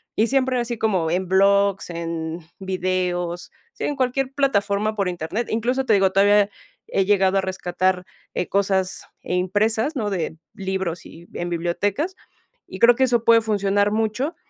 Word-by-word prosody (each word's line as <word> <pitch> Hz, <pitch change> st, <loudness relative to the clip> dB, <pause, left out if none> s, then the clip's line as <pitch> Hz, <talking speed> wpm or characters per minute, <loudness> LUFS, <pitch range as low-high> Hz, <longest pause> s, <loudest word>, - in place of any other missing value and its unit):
y 220 Hz, -, +2 dB
siempre 260 Hz, -1 st, +1 dB
así 235 Hz, 0 st, -3 dB
como 190 Hz, -7 st, +1 dB
en 180 Hz, +2 st, -1 dB
blogs, 195 Hz, +1 st, +3 dB
en 165 Hz, -1 st, -4 dB, 0.2 s
videos, 180 Hz, -2 st, -2 dB, 0.2 s
sí, -, -, -4 dB
en 290 Hz, -, -1 dB
cualquier 260 Hz, 0 st, 0 dB
plataforma 215 Hz, -6 st, +1 dB
por 200 Hz, -3 st, 0 dB
Internet. 175 Hz, +7 st, -3 dB
Incluso, 250 Hz, +4 st, 0 dB
te 220 Hz, -, +4 dB
digo, 190 Hz, -1 st, +4 dB
todavía 205 Hz, +1 st, +4 dB, 0.3 s
he 195 Hz, -, 0 dB
llegado 195 Hz, -1 st, +3 dB
a -, -, +1 dB
rescatar, 185 Hz, 0 st, -1 dB, 0.3 s
eh, 180 Hz, -, -1 dB
cosas, 190 Hz, -1 st, 0 dB, 0.2 s
eh, -, -, -4 dB
impresas, 215 Hz, -, +1 dB
¿no?, 210 Hz, -5 st, -2 dB
de 165 Hz, -3 st, -3 dB, 0.2 s
libros 190 Hz, -3 st, -4 dB
y 170 Hz, +1 st, -14 dB
en 175 Hz, 0 st, -4 dB
bibliotecas. 195 Hz, -, -1 dB, 0.5 s
Y 190 Hz, -, -9 dB
creo 235 Hz, 0 st, +7 dB
que 265 Hz, -, +2 dB
eso 240 Hz, -2 st, +1 dB
puede 230 Hz, -1 st, +6 dB
funcionar 205 Hz, -1 st, +1 dB
mucho, 220 Hz, +8 st, -1 dB
200 Hz, 160 wpm, -22 LUFS, 185-225 Hz, 0.5 s, creo